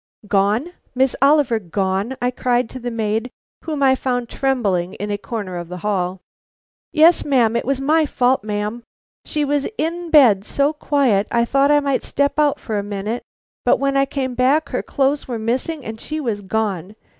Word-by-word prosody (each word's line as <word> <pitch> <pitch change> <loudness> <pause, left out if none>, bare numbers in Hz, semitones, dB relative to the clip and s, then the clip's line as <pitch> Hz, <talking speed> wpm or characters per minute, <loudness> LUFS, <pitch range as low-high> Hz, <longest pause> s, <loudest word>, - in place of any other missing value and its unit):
"Gone? 210 - +1 0.2
Miss 260 0 +2
Oliver 275 -5 +4
gone?" 195 +6 -2
I 245 0 0
cried 245 -1 0
to 260 - -7
the 245 0 -4
maid 225 +1 -2 0.4
whom 300 -3 -2
I 265 -1 +5
found 245 -2 -2
trembling 205 -10 -1
in 205 +1 -4
a 205 - -1
corner 200 -5 -5
of 175 -1 -6
the 180 - -6
hall. 185 -3 -1 0.7
"Yes, 325 +3 +5
ma'am; 240 -5 +2
it - - -1
was 270 +1 0
my 305 +3 +2
fault, 255 -3 +1
ma'am. 210 +2 -3 0.4
She 300 -1 -1
was 285 0 0
in 335 +2 -2
bed 245 -11 +6
so 280 +7 +1
quiet, 270 -9 +1
I 235 0 +2
thought 275 +3 +2
I 295 0 +4
might 280 -2 0
step 285 +2 -1
out 295 -2 +2
for 215 -3 -3
a - - -3
minute, 205 +3 -4 0.4
but - - +4
when 275 0 0
I 275 0 +3
came 260 -2 -3
back 270 +5 +2
her - - -2
clothes 280 +1 0
were 245 -3 -3
missing 255 +7 -2
and 220 0 -7
she 310 0 -4
was 225 -8 -2
gone. 200 -2 -2
245 Hz, 190 wpm, -20 LUFS, 210-280 Hz, 0.7 s, bed